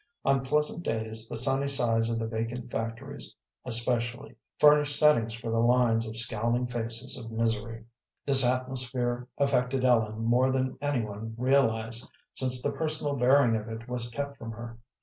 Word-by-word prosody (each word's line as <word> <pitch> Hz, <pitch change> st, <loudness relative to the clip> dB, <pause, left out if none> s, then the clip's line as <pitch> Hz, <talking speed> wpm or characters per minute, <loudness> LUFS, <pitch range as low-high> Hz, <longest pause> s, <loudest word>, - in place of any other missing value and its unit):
On 135 Hz, -1 st, +2 dB
pleasant 150 Hz, +5 st, 0 dB
days 110 Hz, -2 st, -2 dB
the -, -, -3 dB
sunny 135 Hz, +3 st, 0 dB
sides 115 Hz, -4 st, +2 dB
of 115 Hz, -, -1 dB
the 115 Hz, -, -2 dB
vacant 115 Hz, +2 st, -4 dB
factories, 115 Hz, +5 st, -5 dB, 0.3 s
especially, 120 Hz, +1 st, -2 dB, 0.2 s
furnished 150 Hz, -1 st, +5 dB
settings 115 Hz, -7 st, +3 dB
for 115 Hz, 0 st, -5 dB
lines 115 Hz, -1 st, +2 dB
of 110 Hz, -, -8 dB
scowling 115 Hz, +1 st, -1 dB
faces 120 Hz, +1 st, 0 dB
of 115 Hz, -4 st, -7 dB
misery. 115 Hz, 0 st, -2 dB, 0.4 s
This 135 Hz, -1 st, +6 dB
atmosphere 125 Hz, -1 st, -1 dB
affected 130 Hz, -1 st, +1 dB
Ellen 110 Hz, -3 st, +2 dB
more 125 Hz, +3 st, +3 dB
than 130 Hz, 0 st, -1 dB
any 145 Hz, -5 st, 0 dB
one 110 Hz, +2 st, -7 dB
realized, 115 Hz, -3 st, +1 dB, 0.2 s
since 125 Hz, -1 st, -1 dB
the -, -, 0 dB
personal 155 Hz, -2 st, -2 dB
bearing 125 Hz, -1 st, +4 dB
of 110 Hz, +1 st, -4 dB
it 115 Hz, +1 st, -7 dB
was 125 Hz, -1 st, -2 dB
kept 140 Hz, +3 st, -5 dB
from 115 Hz, -1 st, -7 dB
her. 115 Hz, +1 st, -9 dB
120 Hz, 155 wpm, -28 LUFS, 115-130 Hz, 0.4 s, This